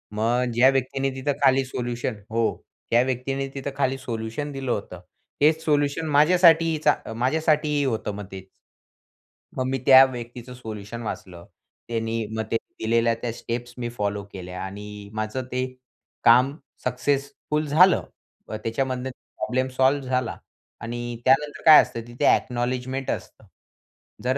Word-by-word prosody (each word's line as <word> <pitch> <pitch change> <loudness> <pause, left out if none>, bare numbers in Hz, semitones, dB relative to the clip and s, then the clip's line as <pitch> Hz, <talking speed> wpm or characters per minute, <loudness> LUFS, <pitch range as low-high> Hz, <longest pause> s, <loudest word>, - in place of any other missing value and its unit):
मग 115 +3 +1
ज्या 125 +3 +6
व्यक्तीने 135 0 0
तिथं 135 +2 -1
खाली 135 0 +4
सोल्युशन 120 -2 -3 0.2
हो, 115 0 +2 0.5
त्या 120 - +5
व्यक्तीने 135 +2 -2
तिथं 135 +1 -4
खाली 135 -1 +1
सोल्युशन 115 +3 -4
दिलं 135 -2 -3
होतं. 90 -5 -4 0.4
हेच 160 +2 +4
सोल्युशन 145 +1 +1
माझ्यासाठीही 165 +1 +5
चा - - +6 0.2
माझ्यासाठीही 150 +3 +1
होतं, 110 -4 -2
मग 105 0 -6
तेच. 95 -1 -8 1.1
मग 130 - 0
मी 135 - 0
त्या 135 -1 +9
व्यक्तीचं 120 0 -7
सोल्युशन 110 -2 -7
वाचलं. 90 -5 -7 0.4
त्यांनी 115 -1 -2
मग 110 - -1
त्यांनी 115 - -4
दिलेल्या 115 +1 +3
त्या 120 - -2
स्टेप्स 120 +1 -5
मी 120 -1 -3
फॉलो 100 -1 -1
केल्या 90 -1 -7
आणि 105 +1 -8
माझं 110 +4 -3
ते 125 0 0 0.6
काम 125 +4 +5 0.3
सक्सेसफुल 140 +4 -1
झालं. 175 +6 +5 0.5
अ, 110 - -4
त्याच्यामधनं 130 +2 -2 0.3
प्रॉब्लेम 130 +1 -1
सॉल्व्ह 135 +1 +2
झाला 125 -2 -1 0.4
आणि 120 0 -5
त्यानंतर 140 +3 +2
काय 155 -1 +10
असतं 115 - -5
तिथे 120 +1 -2
अ‍ॅक्नॉलेजमेंट 125 +2 0
असतं. - - -7 0.8
जर 130 +2 +1
125 Hz, 140 wpm, -24 LUFS, 115-135 Hz, 1.1 s, काय